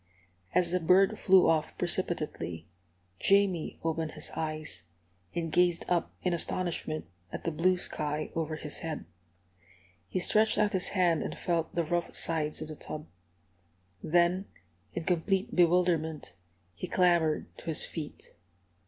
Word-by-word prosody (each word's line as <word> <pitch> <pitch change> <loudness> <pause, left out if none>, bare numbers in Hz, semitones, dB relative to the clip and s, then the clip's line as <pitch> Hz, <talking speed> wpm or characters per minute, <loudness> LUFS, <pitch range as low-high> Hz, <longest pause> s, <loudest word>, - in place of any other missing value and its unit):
As 175 -2 +3
the 180 - +2
bird 185 +3 +4
flew 190 -1 +6
off 155 -1 +1
precipitately, 165 - -1 0.5
Jamie 195 -4 +2
opened 160 -1 -1
his - - -5
eyes, 155 - -4 0.5
and 165 -2 -2
gazed 175 0 +2
up 175 -2 0
in 180 - +1
astonishment 170 -2 -1 0.3
at - - -6
the 165 - -1
blue 180 +4 +2
sky 150 -3 -2
over 160 -1 -2
his 150 -1 -5
head. 160 -2 -5 1.0
He 185 - -2
stretched 215 +4 +3
out 210 0 +2
his 185 -1 +2
hand 175 -3 +3
and - - -4
felt 165 -2 -1
the 170 - +2
rough 175 +2 -2
sides 155 -2 +2
of 155 - -9
the 155 - -6
tub. 150 +1 -7 1.0
Then, 175 +3 +2 0.5
in 170 - -2
complete 190 +6 0
bewilderment, 165 - +2 0.4
he 85 - -6
clambered 170 -4 +2
to - - -13
his 160 -2 +1
feet. 155 -3 -8
170 Hz, 140 wpm, -30 LUFS, 155-180 Hz, 1.0 s, flew